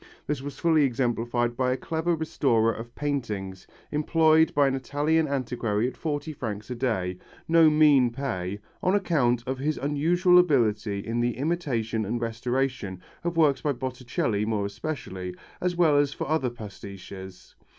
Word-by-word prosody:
This 150 -2 -2
was 140 0 -7
fully 160 -3 +3
exemplified 120 -2 0
by 125 0 +1
a 130 - 0
clever 165 +3 -1
restorer 120 -8 +1
of 120 +2 -9
paintings, 105 -10 -3 0.2
employed 160 +1 +4
by 145 -1 +5
an 135 - +1
Italian 145 +4 +1
antiquary 120 -5 -1
at 130 - -6
forty 155 0 -3
francs 110 -4 -5
a - - -2
day 95 -8 -1 0.3
no 165 -1 +6
mean 150 -5 +5
pay 115 -7 -3 0.2
on 185 +2 +2
account 130 - +1
of 130 0 -3
his 150 +3 -1
unusual 175 +6 +3
ability 110 - +1
in 115 +1 -2
the 120 -1 0
imitation 130 -8 -1
and 115 +4 -2
restoration 120 -3 -2 0.2
of 170 -1 -2
works 150 -4 +4
by 145 -2 0
Botticelli 120 -4 -2
more 105 -2 -1
especially, 100 -5 -5 0.3
as 180 0 0
well 165 -4 +4
as 145 -1 +3
for - - -4
other 155 -4 +1
pastiches. 100 -4 -10
130 Hz, 155 wpm, -26 LUFS, 115-150 Hz, 0.3 s, no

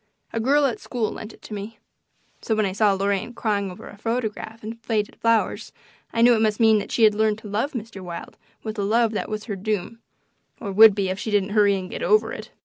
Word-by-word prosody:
A 230 - -1
girl 280 +5 +3
at 250 -5 -1
school 230 -4 -2
lent 215 - -8
it - - -19
to - - -9
me. 210 +2 -6 0.6
So 220 - 0
when 215 -1 +1
I 190 - -1
saw 205 +1 +3
Lorraine 200 +4 -1
crying 205 -4 -1
over 180 - -10
a 205 - -13
photograph 225 -1 -3
and 230 +2 -7
faded 215 -3 -1
flowers 230 -1 +1 0.4
I 230 - +2
knew 240 0 +7
it 220 - +2
must 215 -1 +1
mean 220 -2 +5
that 200 - -7
she 230 - +2
had 215 -1 +7
learned 215 0 +1
to 220 - -11
love 215 +8 -1
Mr. 225 -5 -6
Wilde 175 -2 -8 0.3
with 220 -1 -5
a - - 0
love 225 +2 +2
that 215 - -3
was 215 0 -4
her 210 -3 -4
doom, 210 +3 -3 0.6
or 200 - -5
would 215 +1 +8
be 195 -2 0
if 190 +1 -3
she - - -4
didn't 205 -2 +1
hurry 205 -1 +4
and 185 -1 -5
get - - -5
over 430 -4 +2
it. - - -8
215 Hz, 240 wpm, -23 LUFS, 200-230 Hz, 0.6 s, would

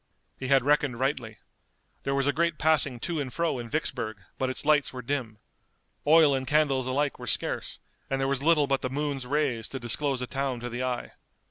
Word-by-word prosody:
He 130 - -3
had 135 -1 +4
reckoned 145 -4 +2
rightly. 130 -5 -1 0.7
There 135 - 0
was 140 0 +1
a 145 - +2
great 170 -1 +1
passing 150 -5 +2
to 170 -3 -2
and 135 -3 -3
fro 165 -4 -1
in 120 -1 -6
Vicksburg, 125 -7 -2 0.2
but 130 - +1
its 130 - -3
lights 150 -2 +3
were 125 -1 -7
dim. 120 -4 -3 0.7
Oil 155 -2 +7
and 130 -1 -2
candles 140 -3 +2
alike 140 +2 0
were 120 - -7
scarce, - - -1 0.3
and 135 - 0
there 135 - +1
was 135 -1 0
little 155 -1 +4
but 135 -1 0
the 130 - -2
moon's 140 -2 -2
rays 135 -5 0
to 135 - -6
disclose 130 +3 0
a 125 - -2
town 135 -1 -2
to 120 - -4
the 120 +1 -4
eye. 125 -1 -2
135 Hz, 210 wpm, -28 LUFS, 125-145 Hz, 0.7 s, Oil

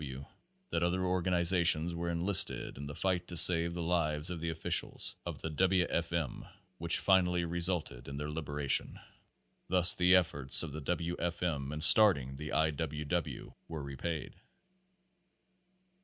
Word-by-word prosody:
W. 65 -3 -7
W. - - -12 0.5
that 85 - -1
other 90 +2 -1
organizations 85 -2 +1
were 85 0 -4
enlisted 85 +3 +1
in 70 +1 -8
the 75 - -8
fight 90 -1 -2
to 85 - -7
save 85 0 +6
the 85 - -4
lives 80 -1 -1
of 85 - -6
the 85 +1 -4
officials 80 0 -1
of - - -8
the 80 - -3
W. 90 +3 +1
F. 85 0 -2
M. 85 -6 -4 0.4
which 85 0 0
finally 90 -2 +1
resulted 85 -7 -3
in 70 0 -7
their 75 +1 -5
liberation. 75 -2 -1 0.7
Thus 90 -1 +6
the 90 +1 +3
ef 90 -3 +2
forts 70 +1 +4
of 75 -4 -7
the 80 - -6
W. 85 +3 -3
F. 85 0 -4
M. 70 -5 -3
in 75 0 -6
starting 80 -8 +4
the 75 +2 -8
I. 80 0 +1
W. 75 0 -5
W. 85 +1 -4
were 80 -3 -7
re 70 0 -8
paid. 80 +3 -5
85 Hz, 170 wpm, -31 LUFS, 75-90 Hz, 0.7 s, save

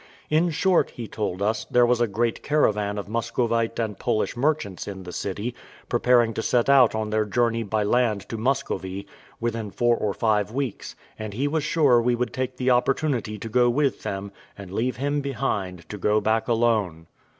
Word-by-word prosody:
In 160 +3 +3
short, 180 +3 +2
he 115 -2 -7
told 100 -3 -3
us 110 +1 0
there 120 0 +5
was 120 0 +2
a 120 - +3
great 115 +3 -1
caravan 105 -9 +1
of 100 - -5
Muscovite 115 +1 -1
and 110 -4 -3
Polish 110 - 0
merchants 125 - -1
in 95 -2 -6
the 90 - -8
city, 100 +7 -4 0.4
preparing 120 -2 +3
to 110 - -2
set 120 +2 +1
out 130 -5 +6
on 110 -1 -2
their 110 0 +2
journey 115 +2 +1
by 110 0 -1
land 105 -3 +1
to - - -4
Muscovy, 110 -7 -2 0.3
within 115 -2 -2
four 120 +3 +2
or 105 -3 -2
five 105 -3 +1
weeks; 130 -3 -4 0.2
and 110 -2 -5
he 135 +5 0
was 155 +1 -1
sure 140 -8 +4
we 120 +1 +2
would 125 +1 -2
take 130 0 -3
the 130 0 +1
opportunity 125 -3 +1
to 110 - -6
go 120 +2 +3
with 135 +2 +1
them, 100 +1 -4 0.3
and 100 -3 -9
leave 125 +5 0
him 145 +2 -1
behind, 100 - -3
to 105 - -6
go 105 +3 +2
back 110 +1 0
alone. 110 -9 +1
115 Hz, 190 wpm, -24 LUFS, 105-125 Hz, 0.4 s, out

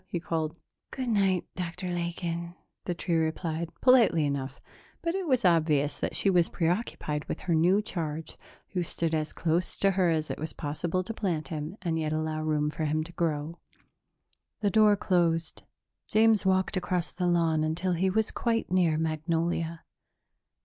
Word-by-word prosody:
he 175 - -3
called. 165 -1 -2 0.3
"Good 255 -2 -4
night, 195 -5 +2
Dr. 180 0 -4
Lakin," 170 0 -3 0.3
the 175 - -2
tree 170 - -2
replied, 160 +1 -1
politely 235 - +5
enough, 140 -1 -3 0.4
but 335 - 0
it 380 -2 -2
was 255 -7 +2
obvious 155 -4 +3
that - - -2
she - - +2
was 180 -3 +4
preoccupied 165 -4 -1
with - - -5
her 175 - 0
new 180 +6 +4
charge, 160 -5 -4 0.3
who 180 - -1
stood 165 -1 -2
as 155 -1 -1
close 170 +1 -1
to 195 - +3
her 185 -2 +2
as 155 -2 0
it - - -5
was 155 +1 -4
possible 165 +5 -2
to 225 - -5
plant 175 -8 -2
him 155 +3 -5
and 165 -2 0
yet 155 -1 -1
allow 155 0 -1
room 150 -1 0
for 155 - -3
him 155 +1 0
to 165 - -10
grow. 160 -2 -1 1.1
The 205 -2 +2
door 210 +1 +6
closed. 170 -4 0 0.5
James 220 -2 +4
walked 190 0 +2
across 180 -2 -1
the 180 +1 -1
lawn 165 -3 +2
until 170 +4 -1
he 180 +2 +1
was 220 +3 +1
quite 230 -5 -1
near 175 -4 +3
Magnolia. 165 +1 -1
170 Hz, 170 wpm, -28 LUFS, 155-185 Hz, 1.1 s, door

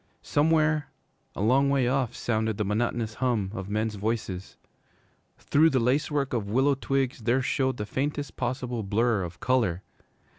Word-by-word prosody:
Somewhere, 155 0 +2 0.5
a 100 - -2
long 135 +5 +4
way 135 -3 +2
off, 130 -2 0
sounded 110 -2 -1
the 105 - -1
monotonous 110 +1 -1
hum 115 -6 0
of 95 -2 -6
men's 110 +1 -1
voices. 100 -3 -3 0.8
Through 155 +3 +3
the 135 -4 +2
lace 130 +5 +1
work 140 -3 -1
of 105 -4 -2
willow 135 +6 +3
twigs 135 -1 -1
there 120 +3 +1
showed 130 -1 0
the 105 - -3
faintest 145 +5 -3
possible 125 -1 -2
blur 110 +2 +1
of 85 -1 -6
color. 115 -9 +1
120 Hz, 155 wpm, -27 LUFS, 110-135 Hz, 0.8 s, long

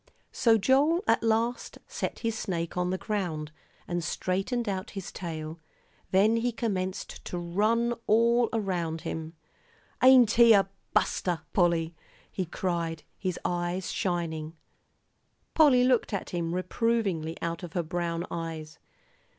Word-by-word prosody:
So 230 -3 +4
Joel 280 - +3
at - - +3
last 230 +2 0
set - - -4
his 225 -1 0
snake 170 -6 -3
on 180 0 0
the 185 - -1
ground, 175 -8 -3 0.4
and 175 -1 -2
straightened 195 - -1
out 190 -1 -3
his 190 - -5
tail; 160 -2 -6 0.5
then 210 +4 +4
he 240 +1 0
commenced 190 -5 -3
to 180 - -4
run 215 +7 +1
all 235 +2 +4
around 175 -7 -2
him. 160 +1 -5 0.7
"Ain't 255 -4 +7
he 235 -1 +7
a 195 -2 +4 0.3
buster, 175 -4 +1
Polly!" 170 -3 +2 0.4
he 185 -3 -3
cried, 170 -2 -2
his 185 -3 -3
eyes 175 +1 -1
shining. 165 -3 -2 1.0
Polly 280 -6 +6
looked 250 -3 +2
at 200 - -3
him 170 -1 -2
reprovingly 185 -4 -1
out 170 0 -3
of 175 -3 -8
her 175 - 0
brown 170 +1 -2
eyes. 160 -2 -5
185 Hz, 135 wpm, -28 LUFS, 170-225 Hz, 1.0 s, Ain't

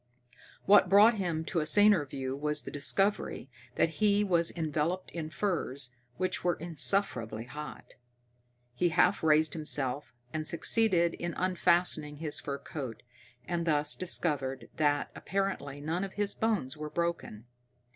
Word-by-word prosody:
What 195 -2 +6
brought 210 +3 +6
him 165 -4 -2
to 170 - -1
a 155 - -1
saner 205 -7 +5
view 130 -1 -4
was 150 +1 -1
the - - -8
discovery 170 -1 0 0.2
that 165 - 0
he 205 -1 +4
was 170 -4 +3
enveloped 165 +2 -2
in 160 -2 -5
furs 155 -8 -3 0.3
which 185 0 -2
were 175 -1 +1
insufferably 155 - 0
hot. 150 +5 -9 0.8
He 175 +8 +1
half 160 - +2
raised 155 -1 +3
himself 145 -3 -2 0.2
and 155 -1 -2
succeeded 170 0 +2
in 175 -1 -5
unfastening 175 -4 +1
his 150 0 -2
fur 140 -1 -4
coat, 135 -6 -7 0.4
and 170 -1 -2
thus 150 -1 +2
discovered 135 -8 -2
that 145 -2 +1
apparently 195 -8 -3
none 165 +5 -2
of 195 - -6
his 205 -1 -1
bones 200 - -1
was 150 -1 -7
broken. 170 -10 -3
160 Hz, 140 wpm, -30 LUFS, 145-185 Hz, 0.8 s, What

